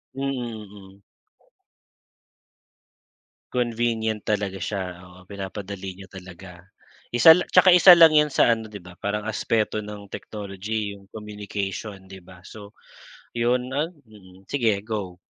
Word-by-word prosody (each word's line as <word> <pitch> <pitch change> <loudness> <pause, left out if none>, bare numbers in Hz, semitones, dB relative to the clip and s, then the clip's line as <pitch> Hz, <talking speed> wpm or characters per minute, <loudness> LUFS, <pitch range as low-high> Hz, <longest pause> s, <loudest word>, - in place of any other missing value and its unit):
Mm, 135 - -5 0.5
mm. 100 -1 -15 2.5
Convenient 115 -3 -1
talaga 100 -3 -2
siya, 95 +2 -3 0.2
oo. 90 0 -16
Pinapadali 95 -1 -7
niya 95 - -11
talaga. 90 -1 -12 0.5
Isa 120 +7 +8
lang 180 - -2
'tsaka 185 -2 +6
isa 180 0 +9
lang 165 -2 +8
'yan 150 0 +4
sa - - +3
ano 110 -1 -6
'di 105 - -8
ba 90 -1 -13
parang 105 +1 -2
aspeto 110 0 -1
ng 105 -1 -9
technology, 105 +1 -5
'yong 100 -1 -16
communication 105 -1 -6
'di 95 -1 -12
ba. 90 0 -17
So 105 -1 -12 0.6
'yon 125 +2 0
ah 150 +4 0
mm. 105 - -19
Sige 115 -4 +1
go. 105 -5 -5
105 Hz, 130 wpm, -24 LUFS, 95-115 Hz, 2.5 s, isa